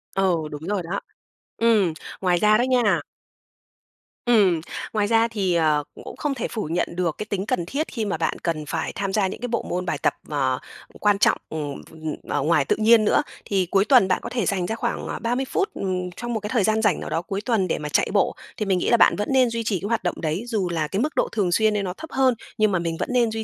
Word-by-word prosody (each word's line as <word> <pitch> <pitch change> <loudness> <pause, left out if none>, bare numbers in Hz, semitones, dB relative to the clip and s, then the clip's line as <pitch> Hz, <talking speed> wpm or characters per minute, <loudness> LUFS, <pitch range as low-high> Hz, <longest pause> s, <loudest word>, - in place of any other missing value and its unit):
Ừ, 190 -3 +2
đúng 150 0 -7
rồi 205 -1 0
đó. 180 +4 -3 0.6
Ừm, 215 -7 +3 0.3
ngoài 180 -2 +2
ra 210 +3 +5
đó - - +2
nha 225 -9 +3 1.3
Ừm, 200 -9 +4 0.3
ngoài 210 -2 +1
ra 225 +1 +4
thì, 200 -6 0
ờ, 155 -3 +2
cũng - - -11
cũng - - -8
không 295 -2 -1
thể 240 - -2
phủ 220 - -4
nhận 170 0 -1
được 175 -3 0
cái 210 - -4
tính 200 -2 -3
cần 175 -4 -1
thiết 285 - -2
khi 225 -4 -3
mà 195 - -1
bạn 160 - -1
cần 160 -3 -2
phải 160 +2 -3
tham 195 -1 -2
gia 200 -2 +2
những 190 - -7
cái 245 - -2
bộ 235 -1 -1
môn 180 +1 -2
bài 175 - -1
tập, - - +1 0.2
ờ, 130 -4 0 0.4
quan 205 -1 +3
trọng, - - +4
ừm, 150 -3 -5
ph - - -18
ừm, 160 -1 -5
ở 145 - 0
ngoài 150 -1 +2
tự - - +2
nhiên 220 0 +5
nữa. 210 - +4 0.2
Thì 195 -2 +1
cuối 195 0 +4
tuần 245 -5 +6
bạn 185 - +1
có - - -5
thể 245 -1 -1
dành 190 -4 0
ra 220 - -2
khoảng, 235 +1 -3
à, - - -4
30 245 +3 -1
phút, 395 +9 0
ừm, 180 -2 -3
trong 240 0 -4
một 220 - -1
cái 210 0 -5
thời 225 -3 +2
gian 220 +2 +2
rảnh 210 -6 +2
nào - - -6
đó 165 - -1
cuối 195 +3 -4
tuần 215 -5 +1
để - - 0
mà 150 - -5
chạy - - +2
bộ, 200 - +2 0.2
thì 215 - -1
mình 190 -2 +2
nghĩ - - 0
là 235 - +5
bạn - - +5
vẫn 210 - -3
nên 260 -2 +4
duy 230 0 -2
trì 210 -4 0
cái 200 - -4
hoạt 230 -2 0
động 175 - -2
đấy, 160 +5 -1
dù 210 -7 -1
là 160 -3 -1
cái 190 +6 -2
mức 300 +5 -1
độ - - +1
thường 200 -5 0
xuyên 215 +4 +3
đấy 205 -1 0
nó 180 -2 -3
thấp 320 - -8
hơn, 260 -1 +3 0.2
nhưng 215 -2 +3
mà 185 - +1
mình 165 -1 -2
vẫn - - -2
nên 240 -3 +3
duy 220 0 -3
200 Hz, 270 wpm, -23 LUFS, 175-225 Hz, 1.3 s, tuần